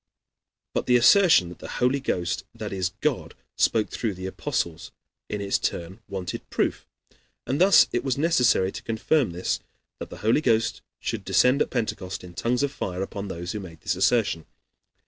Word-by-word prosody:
But - - -1
the 125 - +5
assertion 145 - +6
that 90 - -11
the - - -8
Holy 125 +3 +2
Ghost, 90 -10 -2
that 110 -3 -5
is, 95 -1 -1
God, - - -1 0.2
spoke 110 -2 +2
through 110 -5 -2
the 95 +1 -7
Apostles, 85 -3 -3 0.4
in 105 - -3
its 100 0 0
turn 85 +5 -3
wanted 95 -3 -5
proof. - - -1 0.6
And 140 +6 -1
thus 195 0 +7
it 120 - -1
was 135 -2 -1
necessary, 125 - +3
to - - -7
confirm 115 - +1
this, 90 +1 -2 0.4
that - - -7
the - - -9
Holy 115 +7 +4
Ghost 115 -5 +1 0.2
should - - -3
descend 130 +3 +3
at - - +1
Pentecost 100 -7 -3
in 90 -1 -11
tongues 120 +8 0
of 140 - 0
fire 95 -8 -3
upon 100 +1 -6
those 85 -1 -5
who 105 - -4
made 85 -5 -10
this 95 - -1
assertion. 95 -4 +1
105 Hz, 180 wpm, -25 LUFS, 90-125 Hz, 0.6 s, thus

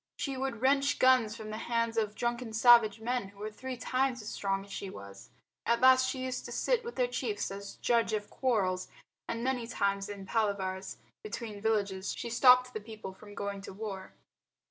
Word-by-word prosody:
She 275 -2 -2
would 260 -3 -3
wrench 280 +2 +3
guns 255 -4 +4
from 215 -1 -7
the 215 - -4
hands 230 -1 -1
of 215 -2 0
drunken 240 -1 -2
savage 230 -2 +6
men 240 -2 -1
who 200 0 -18
were 210 +1 -5
three 255 +4 -6
times 255 -1 0
as - - -5
strong 195 0 -2
as 200 - -15
she 200 - -5
was. 100 - -11 0.3
At 235 0 +2
last 260 0 +6
she 255 0 -3
used 255 -1 -3
to - - -7
sit - - +1
with 470 +1 -7
their 250 - +2
chief 240 -5 -2
as 200 0 -7
judge 235 -2 +1
of 210 -1 -3
quarrels, 190 -8 0 0.4
and 230 0 -3
many 250 -2 -1
times 200 -3 -1
in 200 -1 -7
palavers 195 -3 -1 0.3
between 225 - -6
villages 200 -3 0
she 235 - -5
stopped 250 +1 +6
the 215 - -4
people 215 -3 -8
from 205 +1 -13
going 200 -1 -4
to 195 - -9
war. 195 -2 -7
225 Hz, 195 wpm, -31 LUFS, 200-250 Hz, 0.4 s, savage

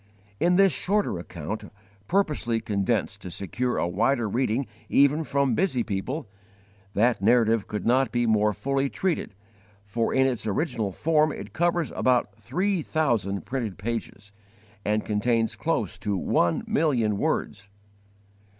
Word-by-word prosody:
In 175 +1 +3
this 195 0 +5
shorter 200 - 0
account, 85 +4 -6 0.4
purposely 150 -12 +1
condensed 105 -1 -1
to 90 - -7
secure 120 +8 -2
a - - +1
wider 115 +6 +1
reading 125 +3 0 0.2
even 140 +3 +4
from 140 -3 +1
busy 130 - +1
people, 115 +8 -3 0.7
that 115 +1 +2
narrative 115 0 +3
could 105 - -4
not 130 +3 +3
be 120 -1 +1
more 105 -1 +3
fully 135 +6 -1
treated, 175 - -2 0.5
for 115 +3 -1
in 130 0 +3
its 125 -4 -1
original 110 - -1
form 155 - +2
it - - -8
covers 175 -1 +1
about 125 -5 +1
three 185 - -1
thousand 120 - 0
printed 120 -7 -3
pages, 100 -1 -5 0.5
and 105 +1 0
contains 115 +2 +1
close - - -2
to 100 -1 -1
one 85 -2 +1
million 120 -10 +1
words. 100 0 -2
120 Hz, 135 wpm, -26 LUFS, 105-140 Hz, 0.7 s, this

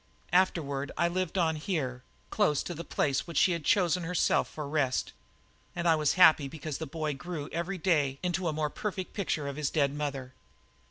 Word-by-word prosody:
Afterward 145 -7 +1
I 170 - +3
lived 185 +1 -2
on 160 -3 +2
here, 150 -8 -2 0.3
close 150 -2 +2
to 175 - -5
the 170 +1 -6
place 140 -3 0
which 170 - -5
she 185 - +5
had 170 -3 -2
chosen 180 +1 +3
herself 175 +1 +1
for 150 -2 -6
rest. 140 -3 0 0.6
And 170 0 -1
I 165 - +6
was 150 -2 +2
happy 160 -5 +6
because 155 0 -6
the 160 - -4
boy 155 0 -2
grew 150 0 -6
every 170 +4 -3
day 150 -7 +1
into 180 0 -1
a - - +1
more 150 -1 -1
perfect 190 -3 -4
picture 160 -7 -2
of 140 0 -5
his 150 -2 0
dead 140 -3 +1
mother. 140 -3 -4
155 Hz, 195 wpm, -29 LUFS, 145-175 Hz, 0.6 s, I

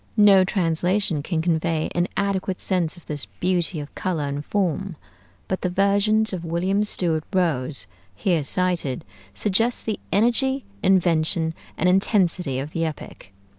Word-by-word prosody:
No 200 -3 +7
translation 180 -2 +1
can 160 +1 -2
convey 165 -1 0
an 175 +1 +1
adequate 195 -2 -1
sense 180 -3 0
of 175 - -16
this 150 -2 -4
beauty 175 -2 0
of 145 0 -8
color 175 -5 -2
and 140 0 -3
form; 195 0 -1 0.5
but 190 - -2
the 180 - 0
versions 200 +3 +2
of 175 -2 -4
William 180 +5 0
Stewart 170 -6 +1
Rose, 155 - 0 0.3
here 165 - 0
cited, 170 - 0 0.3
suggest 225 +4 +1
the 215 -2 -2
energy, 245 +6 +1 0.2
invention, 165 -3 +2 0.2
and 180 - +1
intensity 180 - +2
of 140 +3 -4
the 165 - -2
epic. 150 -10 -7
180 Hz, 140 wpm, -23 LUFS, 160-195 Hz, 0.5 s, No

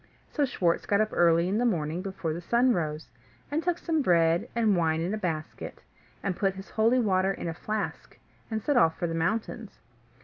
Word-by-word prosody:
So 290 - +1
Schwartz 175 -9 0
got 200 - +3
up 215 0 +2
early 170 0 +4
in 200 +4 0
the - - +1
morning 170 -7 0
before 180 -5 -3
the 170 - -5
sun 240 +7 +3
rose, 155 -4 -3 0.4
and 305 +2 0
took 350 0 0
some 325 -3 0
bread 170 -6 +3
and 220 -4 +3
wine 160 -2 +1
in 175 +5 -1
a - - -1
basket, 160 -5 -5 0.4
and 190 -2 -1
put 195 +1 0
his 195 +1 -10
holy 225 +3 +3
water 195 -5 +2
in 180 - -5
a 165 - -2
flask, 215 +6 -4 0.3
and 220 -2 -3
set 290 -3 +2
off 165 -9 +4
for - - -2
the 165 - -2
mountains. 180 +7 -2
190 Hz, 205 wpm, -28 LUFS, 165-225 Hz, 0.4 s, early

